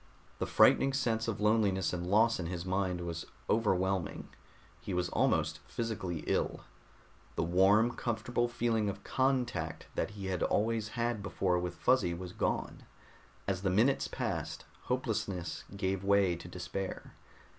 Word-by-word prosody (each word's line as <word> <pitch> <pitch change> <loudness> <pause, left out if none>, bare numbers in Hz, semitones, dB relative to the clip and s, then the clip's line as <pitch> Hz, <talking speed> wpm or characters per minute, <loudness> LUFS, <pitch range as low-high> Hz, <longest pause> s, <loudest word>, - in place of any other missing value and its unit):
The - - -1
frightening 135 0 +5
sense 115 -4 0
of 110 -4 -2
loneliness 105 -4 +2
and 90 0 -3
loss 110 +3 +4
in 85 - -2
his 85 0 -4
mind 95 -1 0
was 85 -1 -5 0.2
overwhelming; 95 -5 0 0.5
he 95 - -4
was 90 0 0
almost - - +1
physically 100 -8 -3
ill. - - 0 0.7
The - - +1
warm, 95 +7 +4
comfortable 120 +1 -1
feeling 115 -3 0
of 100 - -6
contact 125 -11 0
that - - -1
he 100 - -5
had 95 -1 -2
always 110 0 +1
had 120 -2 0
before 95 -2 0
with 90 0 -3
Fuzzy 90 0 +2
was 90 0 -7
gone. - - -2 0.7
As 95 -2 -1
the 95 - +1
minutes 110 +9 +3
passed, - - -3 0.2
hopelessness 105 -8 -2
gave 95 -1 -1
way 100 -3 +4
to 85 0 -9
despair. 90 +2 -5
100 Hz, 145 wpm, -32 LUFS, 90-115 Hz, 0.7 s, frightening